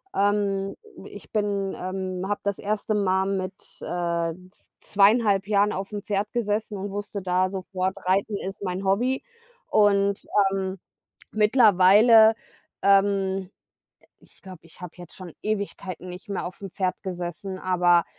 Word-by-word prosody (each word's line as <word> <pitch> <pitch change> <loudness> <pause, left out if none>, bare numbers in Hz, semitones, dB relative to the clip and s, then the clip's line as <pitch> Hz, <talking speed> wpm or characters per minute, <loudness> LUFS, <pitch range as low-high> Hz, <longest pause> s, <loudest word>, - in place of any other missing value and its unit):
Ähm, 200 -1 0 0.3
ich 190 -7 -12
bin, 200 -2 -1
ähm 185 0 -4
habe 205 - -1
das 200 -1 -1
erste 210 +1 -2
Mal 190 -1 +1
mit, 185 0 -4 0.3
äh, 170 -1 -2 0.2
z - - -27
2,5 205 -1 +3
Jahren 205 0 +2
aufm 200 +2 -5
Pferd 205 0 -2
gesessen 215 -2 -2
und 195 +1 -5
wusste 205 0 -5
da 185 0 +1
sofort, 190 0 -3
Reiten 195 +3 +1
ist 195 +1 -6
mein 185 0 -3
Hobby. 245 +8 +1 0.4
Und, 200 -1 +2 0.3
ähm, 190 0 -3 0.5
mittlerweile, 215 0 +6 0.5
ähm 195 -1 +2 0.7
ich - - -24
glaube, 185 -3 -11
ich 165 +2 -19
habe 180 -2 -9
jetzt 175 -2 -12
schon 180 -4 -10
Ewigkeiten 200 -4 -4
nicht 180 +2 -10
mehr 195 - -3
aufm 185 +1 -8
Pferd 185 -1 -1
gesessen, 180 +1 -5
aber 175 -2 +3
195 Hz, 135 wpm, -25 LUFS, 185-205 Hz, 0.7 s, mittlerweile